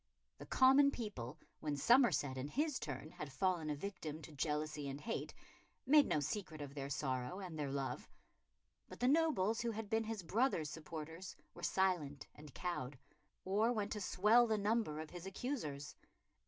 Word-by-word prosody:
The -, -, -9 dB
common 270 Hz, +2 st, +6 dB
people, 210 Hz, -, -5 dB, 0.2 s
when 150 Hz, -2 st, -2 dB
Somerset 235 Hz, -, +4 dB
in 130 Hz, +1 st, -3 dB
his 290 Hz, -, 0 dB
turn 145 Hz, +1 st, -5 dB
had 150 Hz, -2 st, -7 dB
fallen 165 Hz, +2 st, 0 dB
a 150 Hz, -, 0 dB
victim 160 Hz, -3 st, -5 dB
to -, -, -9 dB
jealousy 150 Hz, 0 st, -2 dB
and 135 Hz, +1 st, -5 dB
hate, 225 Hz, +8 st, -3 dB, 0.5 s
made 295 Hz, +1 st, +7 dB
no -, -, +2 dB
secret 160 Hz, +1 st, -3 dB
of 145 Hz, -1 st, -6 dB
their 140 Hz, -1 st, -4 dB
sorrow 130 Hz, +4 st, -2 dB
and 180 Hz, -4 st, -6 dB
their 145 Hz, -2 st, -1 dB
love; 135 Hz, -1 st, -3 dB, 0.8 s
but -, -, -10 dB
the 245 Hz, -, +2 dB
nobles 265 Hz, -, +3 dB
who 235 Hz, -, 0 dB
had 220 Hz, -2 st, -5 dB
been 225 Hz, 0 st, +2 dB
his 220 Hz, -3 st, -4 dB
brother's 190 Hz, -, +1 dB
supporters 165 Hz, +3 st, -7 dB, 0.2 s
were 175 Hz, -, -11 dB
silent 175 Hz, -7 st, +1 dB
and 150 Hz, -1 st, -13 dB
cowed, 145 Hz, -7 st, -3 dB, 0.5 s
or 210 Hz, +5 st, +3 dB
went 210 Hz, -3 st, -1 dB
to 210 Hz, -, -3 dB
swell 215 Hz, +6 st, +5 dB
the 220 Hz, -1 st, +2 dB
number 205 Hz, -7 st, +1 dB
of 155 Hz, -1 st, -6 dB
his 175 Hz, +1 st, -7 dB
accusers. 185 Hz, -, -4 dB
175 Hz, 170 wpm, -38 LUFS, 145-225 Hz, 0.8 s, made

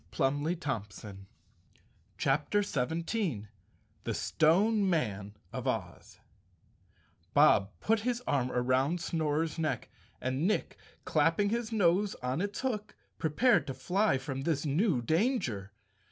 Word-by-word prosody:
220 135 Hz, -, -2 dB, 0.9 s
CHAPTER 150 Hz, +9 st, +1 dB
17 160 Hz, -, -2 dB, 0.5 s
The -, -, -2 dB
Stone 195 Hz, +6 st, +3 dB
Mein 105 Hz, -, -1 dB, 0.2 s
of -, -, -4 dB
Oz -, -, -4 dB, 1.2 s
B -, -, +5 dB
OB 100 Hz, -1 st, +6 dB
put 225 Hz, +1 st, +2 dB
his 245 Hz, +2 st, -2 dB
arm 130 Hz, -3 st, 0 dB
around 130 Hz, +7 st, +1 dB
Snorer's 160 Hz, -1 st, -1 dB
neck, 155 Hz, -1 st, -2 dB, 0.3 s
and 130 Hz, +6 st, -1 dB
Nick, 215 Hz, -, -1 dB, 0.3 s
clapping 165 Hz, +6 st, +2 dB
his 235 Hz, +1 st, -2 dB
nose 200 Hz, -1 st, +2 dB
on 130 Hz, +6 st, -1 dB
its 205 Hz, 0 st, -3 dB
hook, 215 Hz, -6 st, -3 dB, 0.2 s
prepared 160 Hz, -, +3 dB
to 135 Hz, -, -4 dB
fly 180 Hz, +4 st, +1 dB
from 135 Hz, 0 st, -5 dB
this 150 Hz, 0 st, -1 dB
new 150 Hz, -, +1 dB
danger. 155 Hz, -, 0 dB
160 Hz, 115 wpm, -31 LUFS, 130-205 Hz, 1.2 s, OB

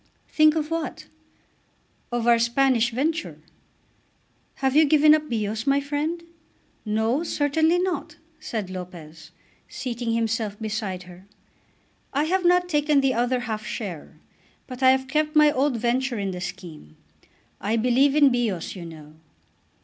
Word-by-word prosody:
"Think 310 Hz, 0 st, +4 dB
of 310 Hz, 0 st, -2 dB
what?" 330 Hz, -1 st, -4 dB, 1.1 s
"Of 240 Hz, -1 st, -1 dB
our 235 Hz, -1 st, +5 dB
Spanish 235 Hz, 0 st, +2 dB
venture." 310 Hz, +7 st, -2 dB, 1.2 s
"Have 265 Hz, 0 st, -1 dB
you 310 Hz, -, +7 dB
given 305 Hz, +1 st, +5 dB
up 305 Hz, -1 st, 0 dB
Bios, 220 Hz, 0 st, -3 dB
my 275 Hz, +1 st, +3 dB
friend?" 295 Hz, +4 st, -3 dB, 0.6 s
"No; 220 Hz, +6 st, 0 dB
certainly 320 Hz, +1 st, +1 dB
not," 365 Hz, 0 st, -2 dB, 0.2 s
said 215 Hz, -10 st, -5 dB
Lopez, 165 Hz, -4 st, -9 dB, 0.4 s
seating 240 Hz, -2 st, -4 dB
himself 225 Hz, -2 st, -1 dB
beside 210 Hz, -4 st, -4 dB
her. 180 Hz, +2 st, -15 dB, 0.9 s
"I 285 Hz, +2 st, +1 dB
have 365 Hz, +4 st, 0 dB
not 355 Hz, 0 st, +3 dB
taken 295 Hz, -3 st, +2 dB
the 270 Hz, -1 st, +2 dB
other 245 Hz, +1 st, 0 dB
half 220 Hz, -3 st, -4 dB
share, 195 Hz, -7 st, -6 dB, 0.5 s
but 255 Hz, 0 st, -9 dB
I 260 Hz, -, +6 dB
have 265 Hz, 0 st, +2 dB
kept 305 Hz, +2 st, -1 dB
my 300 Hz, -1 st, +6 dB
old 270 Hz, -2 st, 0 dB
venture 245 Hz, +2 st, -1 dB
in 200 Hz, -2 st, -2 dB
the 180 Hz, -1 st, -6 dB
scheme. 160 Hz, -, -9 dB, 0.6 s
I 215 Hz, +3 st, -1 dB
believe 250 Hz, +5 st, +3 dB
in 290 Hz, -3 st, +5 dB
Bios, 225 Hz, -9 st, -2 dB
you 175 Hz, -3 st, -8 dB
know." 155 Hz, -2 st, -12 dB
245 Hz, 140 wpm, -24 LUFS, 215-295 Hz, 1.2 s, you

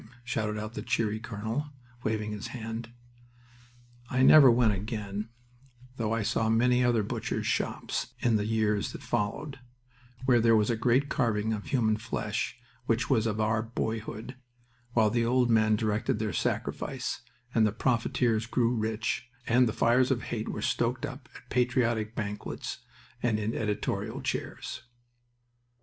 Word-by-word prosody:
shouted 110 Hz, -3 st, -2 dB
out 110 Hz, +1 st, -5 dB
the -, -, -4 dB
cheery 110 Hz, -2 st, 0 dB
colonel, 110 Hz, +6 st, -3 dB, 0.3 s
waving 110 Hz, -2 st, -1 dB
his 105 Hz, -1 st, -5 dB
hand. 115 Hz, -1 st, -5 dB, 1.2 s
I 130 Hz, +1 st, +2 dB
never 140 Hz, -1 st, +9 dB
went 115 Hz, -2 st, +4 dB
again, 105 Hz, +1 st, -4 dB, 0.7 s
though 115 Hz, -2 st, -1 dB
I 115 Hz, -1 st, 0 dB
saw 110 Hz, +2 st, +1 dB
many 125 Hz, +2 st, +4 dB
other 120 Hz, -3 st, +3 dB
Butcher's -, -, -3 dB
Shops -, -, -1 dB
in 120 Hz, -2 st, +2 dB
the 105 Hz, 0 st, 0 dB
years 110 Hz, -2 st, +1 dB
that -, -, -8 dB
followed, 115 Hz, +7 st, -2 dB, 0.7 s
where 125 Hz, -2 st, +5 dB
there 115 Hz, 0 st, +5 dB
was 105 Hz, +2 st, +3 dB
a -, -, +1 dB
great 125 Hz, +5 st, +2 dB
carving 110 Hz, -6 st, 0 dB
of 105 Hz, -1 st, -5 dB
human 110 Hz, -6 st, +2 dB
flesh 110 Hz, +1 st, -3 dB, 0.3 s
which 115 Hz, +1 st, +1 dB
was 115 Hz, -3 st, +3 dB
of 110 Hz, 0 st, -2 dB
our 110 Hz, 0 st, +2 dB
boyhood, 110 Hz, +1 st, -4 dB, 0.6 s
while 110 Hz, -3 st, +4 dB
the 120 Hz, 0 st, +2 dB
old 125 Hz, 0 st, +3 dB
men 110 Hz, -1 st, +4 dB
directed 105 Hz, 0 st, 0 dB
their 110 Hz, -1 st, -2 dB
sacrifice, -, -, -2 dB, 0.3 s
and 110 Hz, -2 st, +4 dB
the -, -, 0 dB
profiteers 115 Hz, -1 st, +1 dB
grew 120 Hz, 0 st, +2 dB
rich, 110 Hz, +2 st, -2 dB, 0.2 s
and 125 Hz, +2 st, +4 dB
the -, -, 0 dB
fires 125 Hz, +3 st, +3 dB
of 125 Hz, -4 st, 0 dB
hate 110 Hz, -2 st, -3 dB
were -, -, -4 dB
stoked 120 Hz, +1 st, 0 dB
up 130 Hz, +1 st, -9 dB
at -, -, -13 dB
patriotic 120 Hz, -3 st, +1 dB
banquets 105 Hz, -2 st, -4 dB, 0.4 s
and 115 Hz, -3 st, +2 dB
in 110 Hz, +2 st, -1 dB
editorial 105 Hz, -2 st, -2 dB
chairs. -, -, -4 dB
115 Hz, 150 wpm, -29 LUFS, 110-120 Hz, 1.2 s, never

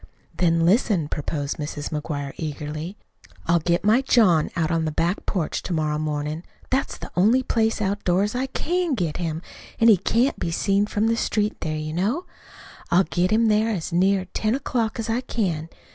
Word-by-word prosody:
"Then 165 Hz, -2 st, +2 dB
listen," 190 Hz, -, +3 dB
proposed 145 Hz, -1 st, -3 dB
Mrs. 145 Hz, -1 st, -4 dB
McGuire 145 Hz, -2 st, -4 dB
eagerly. 155 Hz, +4 st, -5 dB, 0.5 s
"I'll 170 Hz, +1 st, +3 dB
get 170 Hz, +2 st, 0 dB
my 220 Hz, +5 st, +5 dB
John 210 Hz, -, +4 dB
out 165 Hz, 0 st, 0 dB
on 165 Hz, -, +2 dB
to -, -, -1 dB
the 155 Hz, -, -1 dB
back 170 Hz, +5 st, -1 dB
porch 175 Hz, -6 st, -1 dB
to 180 Hz, -, -4 dB
morrow 155 Hz, -2 st, 0 dB
mornin'. 150 Hz, +1 st, -3 dB, 0.3 s
That's 265 Hz, +1 st, 0 dB
the -, -, -9 dB
only 225 Hz, +8 st, +4 dB
place 225 Hz, -2 st, +1 dB
outdoors 200 Hz, 0 st, 0 dB
I 255 Hz, +2 st, -1 dB
CAN 345 Hz, +3 st, -1 dB
get 170 Hz, -8 st, -2 dB
him 165 Hz, -1 st, -3 dB, 0.3 s
he 225 Hz, -3 st, +6 dB
can't 235 Hz, +8 st, +1 dB
be -, -, -2 dB
seen 200 Hz, +4 st, +1 dB
from 210 Hz, +1 st, 0 dB
the 230 Hz, 0 st, +2 dB
street 210 Hz, -2 st, 0 dB
there, 155 Hz, -2 st, -2 dB
you 155 Hz, 0 st, -4 dB
know. 215 Hz, -, -1 dB, 0.6 s
I'll 180 Hz, +2 st, +5 dB
get 180 Hz, 0 st, 0 dB
him 220 Hz, +2 st, +3 dB
there 215 Hz, +1 st, +3 dB
as 180 Hz, -5 st, -3 dB
near 190 Hz, +2 st, +3 dB
ten 220 Hz, +2 st, +1 dB
o'clock 240 Hz, -5 st, -1 dB
as 225 Hz, -1 st, -3 dB
I 230 Hz, +2 st, 0 dB
can. 175 Hz, -11 st, -2 dB
185 Hz, 185 wpm, -24 LUFS, 160-225 Hz, 0.6 s, he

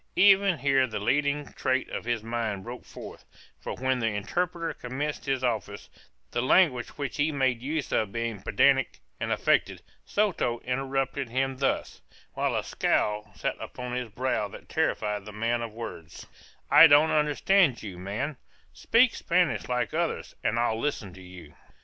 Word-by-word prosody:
Even 195 Hz, -2 st, +5 dB
here 135 Hz, -1 st, +2 dB
the 110 Hz, -2 st, -5 dB
leading 145 Hz, +6 st, 0 dB
trait 130 Hz, 0 st, 0 dB
of -, -, -5 dB
his 120 Hz, -2 st, -1 dB
mind 115 Hz, -4 st, -3 dB
broke 120 Hz, +3 st, -8 dB
forth; -, -, -10 dB, 0.4 s
for -, -, -5 dB
when 130 Hz, 0 st, 0 dB
the 115 Hz, -, 0 dB
interpreter 165 Hz, -, -2 dB
commenced 140 Hz, +4 st, -4 dB
his 135 Hz, -1 st, 0 dB
office, 105 Hz, -4 st, -3 dB, 0.4 s
the 120 Hz, -, 0 dB
language 130 Hz, -2 st, +3 dB
which 140 Hz, -4 st, -4 dB
he 150 Hz, +2 st, +2 dB
made 130 Hz, -4 st, 0 dB
use 150 Hz, +3 st, -3 dB
of 110 Hz, -3 st, 0 dB
being 115 Hz, -3 st, -3 dB
pedantic 135 Hz, +7 st, +2 dB, 0.2 s
and -, -, -2 dB
affected, -, -, +1 dB, 0.2 s
Soto 180 Hz, -, 0 dB
interrupted 135 Hz, 0 st, -2 dB
him 130 Hz, +2 st, -1 dB
thus, 135 Hz, 0 st, -1 dB, 0.3 s
while -, -, -1 dB
a -, -, 0 dB
scowl 105 Hz, 0 st, 0 dB
sat -, -, -2 dB
upon 125 Hz, 0 st, -7 dB
his 125 Hz, -2 st, -3 dB
brow 115 Hz, -1 st, -1 dB
that -, -, -12 dB
terrified 105 Hz, -1 st, -1 dB
the 105 Hz, -, -8 dB
man 115 Hz, +3 st, -1 dB
of 115 Hz, -1 st, -5 dB
words: 85 Hz, -8 st, -8 dB, 0.5 s
"I 165 Hz, -, +10 dB
don't 150 Hz, +1 st, +6 dB
understand 150 Hz, 0 st, +3 dB
you, 95 Hz, -4 st, -7 dB
man; 110 Hz, +10 st, -4 dB, 0.4 s
speak 230 Hz, +1 st, +3 dB
Spanish 175 Hz, -5 st, 0 dB
like 125 Hz, -2 st, -1 dB
others, 170 Hz, +1 st, -2 dB
and 115 Hz, -1 st, +1 dB
I'll 115 Hz, -1 st, +1 dB
listen 110 Hz, -9 st, -3 dB
to 95 Hz, -, -12 dB
you." 90 Hz, -4 st, -12 dB
125 Hz, 160 wpm, -27 LUFS, 110-145 Hz, 0.5 s, I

